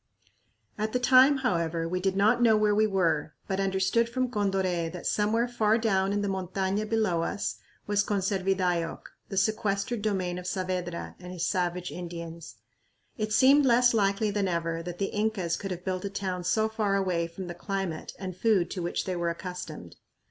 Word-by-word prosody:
At 215 +1 -1
the 250 - +2
time, 260 +3 +6
however, 165 -4 0
we 180 +2 -1
did 190 +1 0
not 215 +5 +4
know 225 -2 +5
where 210 -1 +3
we 215 +1 +3
were, 165 -6 0
but 190 0 -1
understood 195 +4 +1
from 255 0 -1
Condoré 190 -5 0
that 180 0 -8
somewhere 220 +3 +1
far 220 -2 +2
down 195 -4 +1
in 205 0 0
the - - 0
montaña 190 +2 -2
below 215 -7 +1
us 200 - -2 0.3
was 205 0 +2
Conservidayoc, 190 -4 0 0.3
the 195 - -4
sequestered 215 +2 0
domain 185 -4 -1
of 180 - -7
Saavedra 180 -2 -3
and 180 0 -9
his 180 -2 -2
savage 180 -1 -1
Indians. 170 -5 -7 0.6
It 215 0 -1
seemed 270 +6 +6
less 245 -1 +5
likely 205 0 +2
than 200 -1 0
ever 165 -1 -1
that 175 +1 -6
the 195 - -2
Incas 210 -5 0
could 195 - -5
have 180 -1 -6
built 185 -1 -2
a 200 - -2
town 190 -2 -3
so 220 +4 +2
far 215 -2 0
away 180 -4 0
from 170 +3 -8
the 175 - -6
climate 190 -2 -4
and 185 -2 -6
food 190 -4 +2
to 185 - -3
which 175 - -2
they 185 - -2
were 170 -1 0
accustomed. 170 - -7
195 Hz, 185 wpm, -28 LUFS, 175-215 Hz, 0.6 s, time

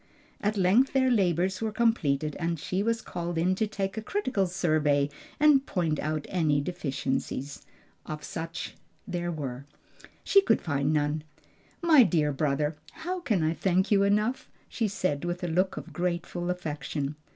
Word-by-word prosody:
At 210 +1 0
length 200 +8 +4
their 260 -1 +3
labors 185 -3 +1
were 220 -1 -1
completed, 155 - +1
and 165 -1 -1
she 185 +6 -1
was 230 +2 0
called 175 -1 -4
in 175 +3 +2
to 215 +3 0
take 200 -1 -3
a - - -1
critical 255 - 0
survey 155 -5 +1 0.3
and 295 -2 +6
point 165 -5 0
out 155 0 -2
any 155 -6 +2
deficiency, 140 -5 -2 0.7
if 155 -1 -5
such 165 +1 -5 0.3
there 175 -1 -2
were. 140 -4 -5 0.6
She 395 - +6
could - - +3
find 140 -2 0
none. 150 0 0 0.6
"My 320 -5 +7
dear 160 -9 +3
brother, 150 +2 0 0.2
how 350 +3 -4
can 210 - 0
I 155 +1 +2
thank 185 +3 +1
you 200 -1 +5
enough?" 210 +5 +1 0.2
she 225 - -1
said, 185 -7 -1
with 175 +1 -3
a - - 0
look 185 +3 +1
of - - -8
grateful 175 0 -2
affection. 150 -4 -3
175 Hz, 160 wpm, -28 LUFS, 155-205 Hz, 0.7 s, My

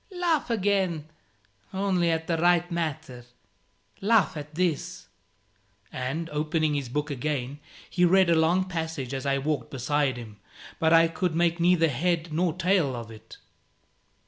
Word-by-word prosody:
Laugh 330 -7 +1
again 190 -7 0 0.7
only 190 -3 +1
at 160 0 0
the 165 - 0
right 175 +1 +2
matter: 150 -7 -4 0.8
laugh 210 -3 +3
at 150 0 -8
this 175 +1 -2 0.4
" 100 0 -41 0.3
And, 135 +6 -3
opening 155 +1 0
his 140 -4 -3
book 150 +3 -2
again, 140 0 -3 0.3
he 180 - 0
read 185 +1 +5
a - - +5
long 175 +4 +2
passage 160 -7 -4
as 135 +1 -3
I 140 0 +2
walked 140 -3 -2
beside 135 0 0
him; 110 -3 -10 0.4
but 160 0 +2
I 165 0 +6
could 165 0 -2
make 170 0 +1
neither 170 -1 +4
head 165 +4 -1
nor 170 +2 +1
tail 180 -6 +1
of 115 -1 -7
it. 110 -1 -13
160 Hz, 150 wpm, -26 LUFS, 140-175 Hz, 0.8 s, I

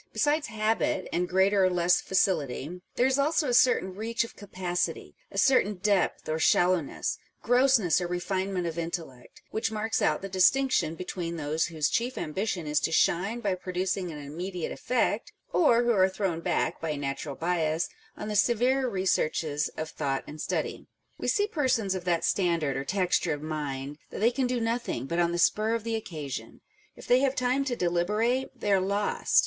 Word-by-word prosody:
Besides 295 +1 +1
habit, 215 -3 0
and 180 +1 0
greater 190 +1 +3
or 185 - +4
less 175 0 +3
facility, 175 -3 0
there 245 - +3
is 265 +1 +2
also 305 +1 +2
a - - +1
certain 240 -6 +4
reach 225 +4 -1
of 230 - -10
capacity, 180 -3 -3 0.2
a - - -9
certain 255 -6 +4
depth 195 0 0
or 155 +1 -1
shallowness, 175 -2 +2 0.2
grossness 245 - +4
or 175 - -1
refinement 185 +1 -2
of 170 0 -3
intellect, 165 -7 -6
which 220 0 -1
marks 220 +1 -1
out - - +1
the - - -3
distinction 190 -1 +3
between 175 -1 -4
those 155 0 -1
whose 160 -3 0
chief 245 +2 -1
ambition 180 +1 -2
is 150 0 +1
to - - -1
shine 195 +8 +2
by 200 -4 0
pro 185 0 -6
ducing 185 0 -1
an 150 - -7
immediate 170 +5 -5
effect, 230 -3 -1 0.2
or 245 -8 +4
who 240 - +2
are 190 -4 +4
thrown 190 -3 -2
back, - - -1
by 165 - -2
a 150 - -2
natural 140 0 -4
bias, 165 -1 0 0.3
on 210 - -5
the 210 - -3
severer 250 +5 +2
researches 160 -6 0
of 155 - -3
thought 135 -3 -2
and 150 0 -8
study. - - -3 0.3
We - - -3
see 410 - +3
persons 260 - 0
of 185 -2 -5
that 170 -2 +1
standard 170 -7 +1
or 135 - -3
texture 180 -3 +1
of 145 0 -6
mind 145 -2 -4
that - - -8
they 230 +4 +4
can 255 +1 0
do 250 0 -1
nothing, 230 - -2
but 170 +5 -2
on 170 0 +2
the 175 - -1
spur 215 +5 +2
of 230 - -3
the 230 0 -2
occasion: 155 -11 -6 0.3
if - - -12
they 245 - +5
have 270 0 +1
time 255 +2 +1
to 250 -3 -1
deliberate, 215 +9 0
they 205 - -1
are 190 - +4
lost. 200 +2 +1
185 Hz, 185 wpm, -28 LUFS, 165-230 Hz, 0.3 s, they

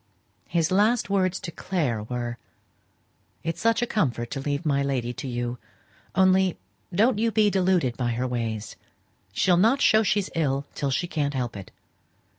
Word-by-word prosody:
His 165 -1 0
last 210 +2 +2
words 185 -2 +1
to 170 - -6
Clare 150 - -2
were 120 +1 -4 1.0
"It's 165 0 -3
such 230 +2 +2
a - - +2
comfort 125 - -1
to - - -3
leave 145 +3 -2
my 140 -2 +2
lady 130 -3 -1
to 135 - -6
you; 120 0 -3 0.6
only 190 -1 +4 0.3
don't 215 +5 +3
you 230 +1 +2
be 215 -2 +3
deluded 180 -10 +1
by 120 -2 0
her 125 +2 -1
ways. 115 -3 -3 0.5
She'll 175 - +3
not 225 +9 +4
show 220 -5 +5
she's 205 -2 0
ill 140 -4 0
till 140 - -2
she 135 +6 0
can't 145 -4 -2
help 120 -3 -2
it. 100 -2 -8
155 Hz, 165 wpm, -25 LUFS, 125-190 Hz, 1.0 s, show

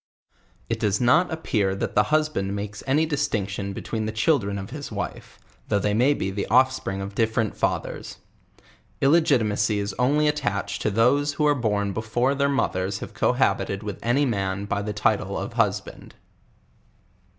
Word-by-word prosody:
It - - -2
does 105 -1 +1
not 125 +10 +3
appeal' 105 -12 0
that - - -3
the 105 - +4
husband 155 -11 0
makes 105 0 -5
any 150 +4 +3
distinction 105 -10 -2
between 110 +2 -4
the - - -2
children 110 -3 +1
of 95 0 -7
his - - -7
wife, - - -6 0.3
though. 105 - +1
they 105 +1 0
may 130 +7 +3
he 95 - -2
the 100 +1 -3
oiftprii 130 -4 +2
g 95 - -4
of 100 +1 -7
different 110 0 0
lathers. - - -2 0.8
II] 135 - +3
i 170 +3 +6
gitimaey 105 -7 +1
is 100 0 -2
only 145 +4 +3
attached 100 -9 -1
to - - +1
th<;se 135 +7 +2
who 150 - +1
are 145 - +5
born 105 -6 -1
before 115 +5 0
their 140 0 +1
mothers 95 -8 0
have - - -8
cohabited 100 +1 +1
with 105 -2 -5
any 130 +5 +2
man 100 -4 -1
by 100 0 -1
t!ie 105 +1 -3
title 105 - 0
of - - -5
hus - - +1
band. - - -13
110 Hz, 175 wpm, -24 LUFS, 100-140 Hz, 0.8 s, i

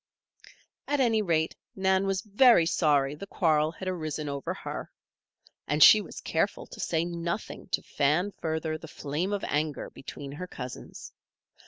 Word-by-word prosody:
At 290 0 0
any 230 -4 +3
rate 165 -5 0 0.2
Nan 190 0 +2
was 195 +1 -1
very 215 -3 +5
sorry 145 -4 +2
the 175 +7 -8
quarrel 155 -5 +2
had 185 - -7
arisen 155 -4 -3
over 140 -1 -3
her. - - -6 0.8
And 150 +1 +5
she 215 - +9
was 185 - -9
careful 165 +5 -1
to - - -12
say 165 0 0
nothing 170 +3 -4
to - - -1
fan 155 +8 +1
further 160 -2 -3
the 160 - -10
flame 155 +6 -3
of 205 -1 -2
anger 150 0 -2
between 140 +1 -8
her 180 +6 -6
cousins. 125 -6 -8
165 Hz, 155 wpm, -28 LUFS, 150-195 Hz, 0.8 s, she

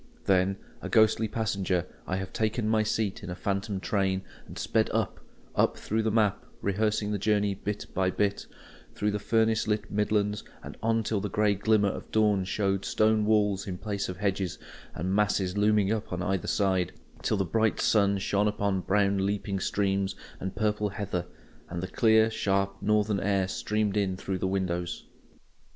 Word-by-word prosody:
Then, 95 0 +3 0.2
a - - -5
ghostly 110 0 +4
passenger, 95 -5 -1 0.2
I 95 - -1
have 95 0 -4
taken 110 0 0
my 110 0 +3
seat 110 -2 -1
in - - -7
a 90 - -4
phantom 100 +1 -2
train, 95 +1 0 0.2
and - - -10
sped - - +1
up, - - -1 0.4
up, - - +2
through 110 +2 -1
the 110 - +1
map, 105 -2 +2 0.2
rehearsing 105 +1 0
the 105 - -1
journey 105 0 +2
bit 105 +2 -4
by 95 -1 +2
bit: 100 +1 -1 0.5
through 105 0 0
the 105 - -2
furnace 110 0 +2
lit 105 0 -1
Midlands, 105 0 0 0.2
and - - -8
on 115 0 +1
till 105 -1 -1
the 105 - -3
grey 105 0 +2
glimmer 105 0 +2
of - - -6
dawn 105 -3 +2
showed 95 0 0
stone 110 0 +2
walls 105 -2 +2
in 90 -2 -4
place 100 -1 -3
of 90 - -5
hedges, 95 -2 -1 0.4
and 90 +3 -2
masses 100 -2 +1
looming 105 -1 +3
up 110 -2 -2
on 90 0 -2
either 95 -1 -1
side; 95 -3 +1 0.3
till 110 - 0
the 95 - +1
bright 110 +4 +1
sun 100 -2 +3
shone 100 +1 +1
upon 100 -2 0
brown 100 +1 +2
leaping 100 0 -1
streams 95 0 0 0.2
and 95 0 -4
purple 105 -1 0
heather, 95 -4 -3 0.4
and 85 0 -4
the - - -2
clear, 110 0 +4
sharp 100 -3 0
northern 105 -1 +2
air 95 -1 +1
streamed 105 +1 -1
in 95 -3 0
through 95 -1 -3
the 95 - 0
windows. 90 -2 -2
100 Hz, 175 wpm, -28 LUFS, 95-105 Hz, 0.5 s, ghostly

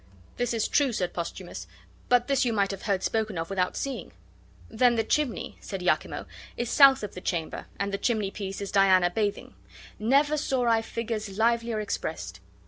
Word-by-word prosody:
"This 245 - 0
is 225 - +1
true," 280 -3 +2
said 180 -4 -2
Posthumus; 170 - -6 0.4
"but 245 -1 +4
this 275 -2 +2
you 245 - +1
might 200 -3 +1
have 195 - -6
heard 195 -3 -1
spoken 215 -4 -1
of 165 +3 -4
without 185 -2 0
seeing." 275 -1 -4 0.6
"Then 240 +2 +3
the 225 - +1
chimney," 275 +2 -1
said 195 -3 -6
Iachimo, 180 - 0 0.3
"is 240 -1 -2
south 275 -4 +7
of 210 - -5
the 180 - -8
chamber, 170 -4 -3
and 200 0 -2
the 200 - -1
chimneypiece 200 -4 -2
is 200 - -4
Diana 190 -3 +5
bathing; 205 +1 -2 0.5
never 280 +7 +3
saw 265 -4 0
I 230 -1 +3
figures 220 -3 -4
livelier 230 0 +1
expressed." 210 -1 -4
215 Hz, 175 wpm, -27 LUFS, 195-240 Hz, 0.6 s, south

